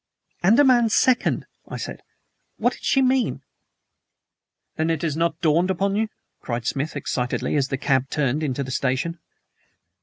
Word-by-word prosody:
"ANDAMAN 240 +4 +5
SECOND," 250 +3 +2 0.2
I - - -6
said. - - -6 0.6
"What - - +1
did - - -14
she 270 - +3
mean?" 255 -1 +1 1.3
"Then 160 +1 0
it 165 -1 -1
has 155 -3 -1
not 165 0 0
dawned 170 +3 +3
upon 195 +2 0
you?" 220 +1 +1 0.3
cried 120 -1 -4
Smith 140 +5 -2
excitedly, 125 -2 -2
as 140 -2 +2
the 135 - -2
cab 135 -1 +1
turned 145 0 0
into 140 -2 -1
the 130 - -6
station. 135 +6 -1
160 Hz, 150 wpm, -23 LUFS, 135-200 Hz, 1.3 s, ANDAMAN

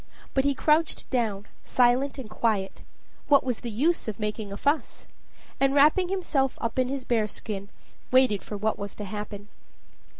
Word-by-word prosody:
But 265 0 +2
he 280 -1 +2
crouched 310 +2 +2
down, 215 -6 0 0.2
silent 255 +3 +2
and 260 -5 -6
quiet; 210 -3 -1 0.5
what 280 -2 +5
was 250 -3 -2
the 240 - -5
use 285 +10 +1
of 215 -1 -4
making 210 -1 -3
a 200 - -5
fuss? 290 +6 -1 0.5
and, 275 0 +3
wrapping 305 +6 +5
himself 320 -9 0
up 230 +2 -2
in 255 - +2
his 265 -1 -4
bear 225 -3 +1
skin, 200 -1 -6 0.4
waited 255 -6 +4
for 210 - -6
what 215 +2 -1
was 200 0 -6
to 210 - -6
happen. 205 0 -6
245 Hz, 170 wpm, -26 LUFS, 210-275 Hz, 0.5 s, what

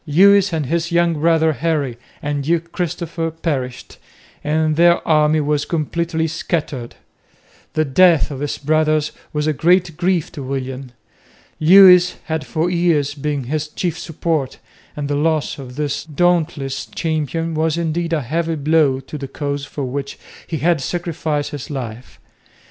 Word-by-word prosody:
Lewis 200 +5 +5
and 160 -3 -1
his 170 +4 -1
young 170 0 +3
brother, 160 0 +2
Henry, 150 -5 -1 0.3
and 145 -1 -2
Duke 170 +2 -1
Christopher 170 -2 -3
perished, 140 -6 -4 0.4
and 155 +1 +1
their 170 +1 +4
army 155 0 +3
was 145 0 0
completely 165 +1 -1
scattered. 150 -6 -3 0.8
The 155 -1 +1
death 165 +2 +4
of 135 - -6
his 145 0 -3
brothers 155 0 +1 0.2
was 150 0 -1
a 155 - +1
great 175 +2 +2
grief 175 -2 0
to 145 - -8
William. 130 -1 -5 0.7
Lewis 180 +1 +7
had 160 -2 -3
for 160 +1 0
years 170 -5 +1
been 145 -1 -3
his 150 +4 -2
chief 170 +1 -3
support, 160 -4 -2 0.4
and 145 -1 -3
the 145 - -1
loss 155 0 0
of 125 -2 -9
this 145 -1 -2
dauntless 160 -3 0
champion 165 0 -2
was 160 +1 0
indeed 170 0 -1
a 160 -3 +1
heavy 165 +6 -1
blow 145 -3 +2
to 145 +3 -8
the 135 - -5
cause 140 0 -4
for 145 0 -6
which 135 +2 -4 0.3
he 160 - -3
had 165 0 +1
sacrificed 160 -2 -2
his 145 -3 -7
life. 125 -4 -7
155 Hz, 150 wpm, -19 LUFS, 145-170 Hz, 0.8 s, Lewis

